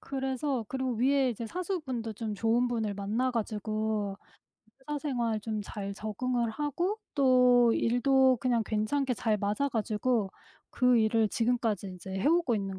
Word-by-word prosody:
그래서 265 -2 -2
그리고 260 -1 -2
위의 265 +2 +2
이제 230 +1 -6
사수분도 270 - -3
좀 215 0 -4
좋은 235 +3 +2
분을 220 -4 -2
만나 220 +6 -1
가지고 215 -2 -2 0.6
회사 295 +2 -4
생활 240 -7 -1
좀 215 0 -3
잘 200 -1 -6
적응을 235 +3 -2
하고 300 - -2 0.2
또 250 -3 +5
일도 260 +2 +3
그냥 240 -3 +1
괜찮게 250 +5 0
잘 215 0 0
맞아 205 +8 0
가지고 220 -2 0 0.4
그 250 -2 +3
일을 220 0 +2
지금까지 225 -4 0
인제 185 +1 -9
해 - - 0
오고 330 -8 +3
있는 195 -2 -3
235 Hz, 295 characters per minute, -29 LUFS, 215-260 Hz, 0.6 s, 또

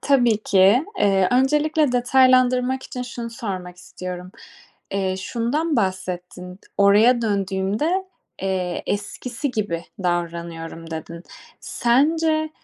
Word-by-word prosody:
Tabii 245 -6 +3
ki. 200 +7 +4
Eee, 195 -2 +3
öncelikle 300 +2 +2
detaylandırmak 255 +1 +3
için 250 - -6
şunu 240 -1 -6
sormak 185 -6 -6
istiyorum. 180 0 -8 0.6
Eee, 190 -1 -1
şundan 255 - -1
bahsettin. 180 -2 -3 0.2
"Oraya 215 +5 +5
döndüğümde, 205 - -1 0.4
eee, 185 -2 -2
eskisi 240 +6 -3
gibi 205 -8 -3 0.2
davranıyorum" 170 -1 -3
dedin. 165 +1 -7 0.4
Sence 310 +5 +1
210 Hz, 95 wpm, -22 LUFS, 185-255 Hz, 0.6 s, Oraya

